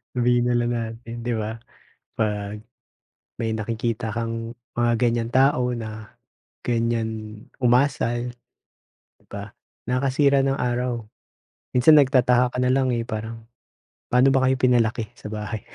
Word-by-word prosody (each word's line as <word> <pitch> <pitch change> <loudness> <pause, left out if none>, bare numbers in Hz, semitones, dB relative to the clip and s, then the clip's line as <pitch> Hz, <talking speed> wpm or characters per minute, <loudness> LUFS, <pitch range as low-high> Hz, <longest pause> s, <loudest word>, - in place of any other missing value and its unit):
Sabihin 120 0 +3
nalang 120 -1 +1
natin 115 +1 -6
di 120 - 0
ba? 110 0 -3 0.6
Pag 105 -1 -2 0.8
may 110 -1 -1
nakikita 115 0 -2
kang 115 0 -3 0.2
mga 120 0 +2
ganyang 120 -1 +1
tao 130 -2 +3
na 110 -2 -7 0.5
ganyan 110 -2 -1 0.2
umasal. 125 -1 +2 0.8
Di - - -33
ba? 100 0 -6 0.4
Nakasira 135 +2 +2
ng 135 0 0
araw. 120 -2 -1 0.7
Minsan 140 +5 +7
nagtataka 125 -2 +3
ka - - -3
nalang 130 0 +2
eh 115 - -1
parang, 115 0 -6 0.7
pano 125 +2 +4
ba 130 -1 +3
kayo 130 - +2
pinalaki 120 -4 +1
sa - - -10
bahay? 105 +1 -4
120 Hz, 120 wpm, -23 LUFS, 110-125 Hz, 0.8 s, Minsan